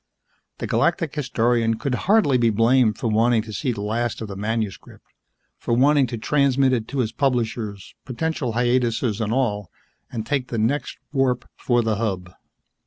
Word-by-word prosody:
The - - -4
Galactic 165 -6 0
Historian 120 -5 +1
could 125 +4 -3 0.2
hardly 190 - +4
be 115 -1 +3
blamed 115 0 +3
for - - -2
wanting 115 +1 +3
to 110 -1 -9
see 130 +4 -1
the 105 -4 -5
last 115 +2 -2
of 110 - -5
the 100 - -6
manuscript, 105 0 -4 0.5
for 115 - 0
wanting 140 +2 +4
to 120 - -5
transmit 135 +1 +2
it 115 -3 -1
to 140 - -5
his 110 -2 -2
publishers, 115 -6 -2
potential 130 -1 -2
hiatuses 120 -2 +1
and 110 -1 -1
all, 105 -7 0 0.4
and 110 -3 -4
take 135 -2 -1
the 115 - -4
next 130 +5 -1 0.2
warp 130 -3 +1
for 120 -1 +1
the 110 -2 0
Hub. 95 -5 -3
120 Hz, 170 wpm, -23 LUFS, 110-130 Hz, 0.5 s, hardly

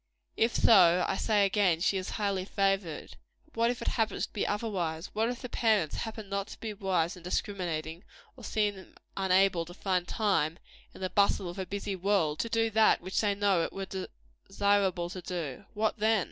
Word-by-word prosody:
If 230 +1 +1
so, 180 -5 +6
I - - 0
say 205 0 +2
again, 195 -4 +2
she 195 - +1
is 185 -1 -3
highly 200 -3 0
favored. 195 -4 -1 0.3
But 310 - -27
what 230 +1 +2
if 245 0 -3
it - - -6
happen 225 -2 -1
to - - -3
be 210 - -1
otherwise? 185 -6 -3
What 220 +2 +1
if 245 +1 -5
the - - -3
parents 215 -10 +1
happen 220 -2 -5
not 200 0 -2
to - - -11
be 220 -2 -5
wise 190 -4 0
and 180 - -14
discriminating, 175 -3 -3 0.3
or - - -14
seem 205 -3 -2 0.2
unable 190 -2 +3
to 175 +1 -12
find 185 -3 -1
time, 180 -7 0 0.4
in - - -12
the 185 -2 -2
bustle 200 -1 +2
of 175 +3 -7
a 190 - -3
busy 200 0 -3
world, 185 -5 +1
to 230 - -1
do 225 0 +1
that 220 0 +4
which 185 +2 -1
they 205 -2 +1
know 200 -3 +2
it - - -2
were 195 -1 -5 0.4
desirable 195 -3 +1
to 185 - -6
do? 170 -2 -5
What 215 +1 0
then? 220 0 +3
195 Hz, 200 wpm, -30 LUFS, 180-210 Hz, 0.4 s, so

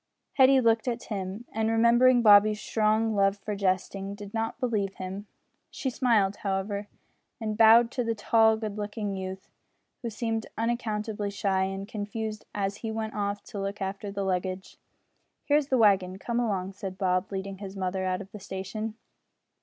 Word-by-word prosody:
Hetty 265 0 +6
looked 230 -1 +2
at 235 -1 -1
Tim, 200 0 -5
and, 220 0 0
remembering 240 +2 +5
Bobby's 210 0 +7
strong 220 +1 +1
love 195 0 +3
for 210 +1 -4
jesting, 195 0 -1
did 205 -1 -10
not 225 0 -2
believe 210 -6 -1
him. 190 +3 -6 0.4
She 265 - -3
smiled, 220 -6 +2
however, 200 +1 -2 0.5
and 215 -2 -2
bowed 230 +1 +7
to 250 - -1
the 230 -1 -1
tall 220 +1 +4
good 215 -1 -5
looking 205 -1 -3
youth, 190 0 -6 0.5
who 235 - -3
seemed 225 0 -2
unaccountably 220 -3 -2
shy 195 -2 0
and 195 +1 -5
confused 215 +1 -5
as 200 0 -1
he 225 - -5
went 220 0 -3
off 205 0 -2
to 205 - -7
look 195 +1 -3
after 195 +1 -4
the 200 0 -3
luggage. 185 0 -3 0.7
"Here 290 - +4
is 295 -2 0
the 260 - +2
wagon; 190 -4 +3
come 235 +4 -2
along," 195 -5 -1
said 190 -1 -6
Bob, 185 0 0
leading 195 0 -5
his 200 -1 -7
mother 190 0 -2
out 185 0 -1
of 195 -1 -11
the 210 - -9
station. 200 +4 -5
205 Hz, 170 wpm, -28 LUFS, 195-225 Hz, 0.7 s, Bobby's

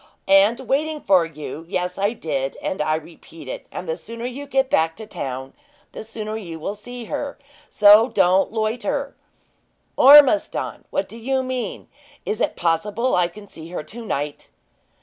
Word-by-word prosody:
"And 200 +6 +5
waiting 300 +4 -1
for 185 - +3
you 155 0 -8
yes, 180 0 -2
I 200 +3 +1
did, 135 - -3
and 185 - -3
I 155 +1 +1
repeat 160 -1 -10
it; - - -7
and 180 - -6
the 160 - -1
sooner 230 +7 -8
you 270 +3 -6
get 270 -1 +1
back 160 -8 +1
to 220 - -9
town, 135 -9 -6 0.4
the - - -8
sooner 215 -1 -6
you 170 -7 -7
will 195 - -3
see 240 +3 -9
her; 280 +5 -4 0.3
so 210 +3 +7
don't 190 -2 +3
loiter 245 +6 -2 0.4
" - - -44
"Ormiston, 290 +2 +6
what - - -1
do 230 - -11
you 260 +3 0
mean! 255 -1 -4 0.4
Is 215 - -2
it - - 0
possible 200 +9 0
I 180 -1 +3
can 205 +4 -13
see 165 -4 -11
her 175 - -5
to 235 +7 -8
night?" 145 - -4
210 Hz, 170 wpm, -22 LUFS, 165-245 Hz, 0.4 s, so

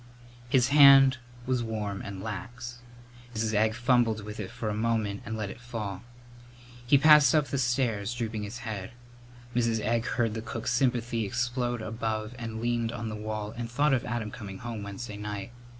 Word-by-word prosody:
His 125 0 +3
hand 135 -2 +8 0.3
was 130 -2 +1
warm 105 -3 -3
and 100 -1 -7
lax. 120 +3 -6 0.6
Mrs. 110 0 -1
Egg 110 +1 +2
fumbled 120 -3 +2
with 105 +1 -7
it 95 -3 -4
for 120 -2 -5
a 105 - 0
moment 110 -2 0
and 110 0 -3
let 105 -2 -3
it - - -12
fall. 110 -6 -5 0.9
He 140 - +6
passed 150 -1 +7
up 150 -2 +2
the 140 - -1
stairs, 120 -4 0
drooping 115 -3 -3
his 105 +3 -5
head. 105 -2 -5 0.6
Mrs. 115 -2 +2
Egg 115 +2 0
heard 115 -3 0
the 110 - -4
cook's 110 +1 -3
sympathy 120 -2 +1
explode 120 +2 -1
above 110 0 -3
and 115 -1 -5
leaned 120 -1 0
on 115 -2 -4
the 110 - -4
wall 105 0 -4
and 120 -1 -4
thought 145 +4 +2
of 130 - +1
Adam 115 -3 -3
coming 105 -6 -8
home 115 0 -6
Wednesday 100 +2 -6
night. 105 +1 -5
115 Hz, 180 wpm, -28 LUFS, 105-120 Hz, 0.9 s, hand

